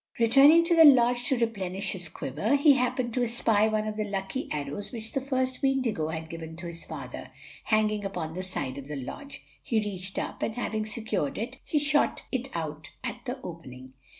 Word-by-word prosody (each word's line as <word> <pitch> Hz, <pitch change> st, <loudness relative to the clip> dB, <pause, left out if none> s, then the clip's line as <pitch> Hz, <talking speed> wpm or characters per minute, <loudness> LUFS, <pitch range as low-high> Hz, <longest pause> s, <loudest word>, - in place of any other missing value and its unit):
Returning 275 Hz, +8 st, +7 dB
to 340 Hz, 0 st, +2 dB
the 325 Hz, -, +8 dB
lodge 245 Hz, -4 st, +6 dB
to 265 Hz, -, +2 dB
replenish 195 Hz, -5 st, -1 dB
his 180 Hz, -4 st, -4 dB
quiver, 150 Hz, -, -1 dB
he 285 Hz, +1 st, +6 dB
happened 250 Hz, -2 st, 0 dB
to 250 Hz, -, 0 dB
espy 225 Hz, -3 st, +3 dB
one 215 Hz, 0 st, 0 dB
of 215 Hz, 0 st, -4 dB
the 215 Hz, -, 0 dB
lucky 200 Hz, +5 st, -4 dB
arrows 145 Hz, +7 st, -4 dB
which 225 Hz, -3 st, -6 dB
the 270 Hz, -, -1 dB
first 260 Hz, -1 st, -1 dB
Weendigo 255 Hz, -, +1 dB
had 160 Hz, 0 st, -4 dB
given 160 Hz, 0 st, -7 dB
to 175 Hz, +1 st, -8 dB
his 170 Hz, -1 st, -5 dB
father, -, -, -7 dB, 0.4 s
hanging 215 Hz, -1 st, +2 dB
upon 175 Hz, -5 st, -4 dB
the 185 Hz, -, -4 dB
side 140 Hz, -8 st, -4 dB
of 140 Hz, -, -10 dB
the 150 Hz, -, -5 dB
lodge. 275 Hz, -, -8 dB, 0.2 s
He 225 Hz, -, 0 dB
reached 195 Hz, -2 st, -4 dB
up, -, -, -4 dB
and 220 Hz, -, -1 dB
having 220 Hz, -3 st, -2 dB
secured 220 Hz, -, -2 dB
it, 245 Hz, +4 st, -5 dB
he 305 Hz, -, -1 dB
shot 295 Hz, 0 st, +2 dB
it 260 Hz, 0 st, -1 dB
out 155 Hz, -2 st, -4 dB
at 240 Hz, -1 st, -5 dB
the 255 Hz, +2 st, -4 dB
opening. 130 Hz, -7 st, -9 dB
215 Hz, 200 wpm, -28 LUFS, 170-255 Hz, 0.4 s, the